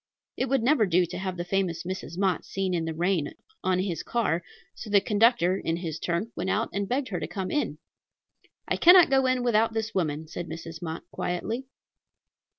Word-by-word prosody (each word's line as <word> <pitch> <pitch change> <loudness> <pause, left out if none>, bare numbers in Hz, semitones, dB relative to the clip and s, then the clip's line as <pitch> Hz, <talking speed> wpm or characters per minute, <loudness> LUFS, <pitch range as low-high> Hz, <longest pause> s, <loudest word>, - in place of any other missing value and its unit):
It 260 - -1
would 270 -3 +2
never 245 -4 +4
do 180 0 +3
to 175 +2 -7
have 185 -1 -3
the 175 - -3
famous 180 -3 -1
Mrs. 180 -2 -6
Mott 190 -3 +1
seen 190 -1 -2
in 165 -2 0
the 165 - -3
rain 170 -3 0 0.3
on 185 -1 +2
his 185 -3 -2
car; 220 -8 0 0.3
so 220 - -9
the 205 -1 +6
conductor, 210 -3 +3
in 165 0 -1
his 165 -3 -4
turn, 175 +6 -2
went 185 +2 -2
out 220 +3 0
and 200 0 -2
begged 260 +1 -1
her 180 -4 -2
to 150 - -4
come 185 +2 -4
in. 295 - -1 0.9
"I - - 0
cannot 355 -3 +8
go 265 -1 +4
in 255 -1 +1
without 225 -1 +2
this 225 0 -2
woman," 155 -4 -1
said 175 +2 -6
Mrs. 165 +1 -8
Mott 160 -1 -5
quietly. 225 +9 -3
190 Hz, 200 wpm, -27 LUFS, 170-225 Hz, 0.9 s, cannot